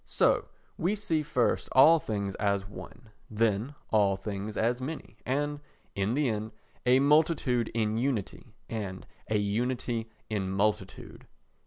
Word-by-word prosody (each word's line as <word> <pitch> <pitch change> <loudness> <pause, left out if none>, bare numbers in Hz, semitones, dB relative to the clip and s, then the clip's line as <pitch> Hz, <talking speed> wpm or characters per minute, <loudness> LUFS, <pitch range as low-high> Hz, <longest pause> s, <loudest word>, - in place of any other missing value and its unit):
So - - +2 0.3
we 185 +6 +1
see 170 -7 0
first 125 -4 0
all 155 +5 +8
things 100 -6 -3
as 100 -1 0
one, 110 +2 -11 0.2
then 110 +4 0 0.2
all 100 -3 +4
things 100 +2 -5
as 120 +3 +1
many 150 +4 -6
and, 145 +3 0 0.3
in 100 +4 0
the 145 -1 +2
end, 110 -1 -2 0.3
a 125 +1 +6
multitude 140 -5 +3
in 110 -1 +1
unity 120 -2 -3
and 100 -4 -5 0.2
a 110 - +2
unity 115 +2 -1 0.2
in 100 -3 -2
multitude. 100 0 -2
115 Hz, 135 wpm, -29 LUFS, 105-130 Hz, 0.3 s, all